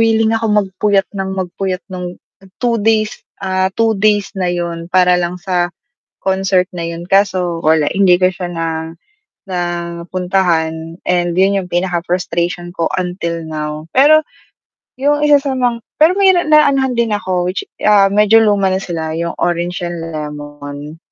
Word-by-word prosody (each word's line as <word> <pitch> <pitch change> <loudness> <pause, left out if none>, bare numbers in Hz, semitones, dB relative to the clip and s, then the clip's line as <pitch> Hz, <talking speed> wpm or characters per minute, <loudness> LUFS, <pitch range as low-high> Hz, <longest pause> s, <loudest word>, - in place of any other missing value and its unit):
willing 225 0 +3
ako 225 0 -1
magpuyat 195 +1 0
nang 190 0 -3
magpuyat 185 0 -3
nung 180 -1 -5 0.4
2 240 -2 +1
days, 215 0 +1 0.3
ah, 185 0 +1
2 225 -1 +3
days 205 -1 +1
na 185 -2 0
'yun 170 -1 -3
para 180 0 +4
lang 175 +1 -2
sa 175 -2 -1 0.5
concert 190 -1 +2
na 170 -1 -4
'yun. 170 0 -6
Kaso 185 -4 +1
wala 155 -1 +3
hindi 190 -2 +4
ko 185 - +4
siya 180 -1 -5
na 165 -1 -3 0.8
na 180 - -2 0.5
puntahan 170 -3 -1
and 175 -1 +1
'yun 195 +2 +3
'yung 180 -1 -10
pinaka-frustration 175 0 -1
ko 165 - 0
until 170 -2 -3
now. 155 0 -5
Pero, 310 +3 +6 0.8
'yung 290 +2 +1
isa 290 -1 +6
sa 275 - -1
mang 240 -2 0 0.2
pero 325 +5 +5
mahira 380 -3 +4
na 305 0 +6
anohan 265 -3 +1
din 235 -2 +1
ako 185 -2 -1
which, 185 - -2 0.2
ah, 205 -2 +5
medyo 210 +2 +5
luma 205 -2 +2
na 190 - 0
sila 160 -3 -4
'yung, 170 0 -3
Orange 175 +1 -1
and 175 -1 -4
Lemon. 145 0 -7
185 Hz, 155 wpm, -16 LUFS, 170-210 Hz, 0.8 s, Pero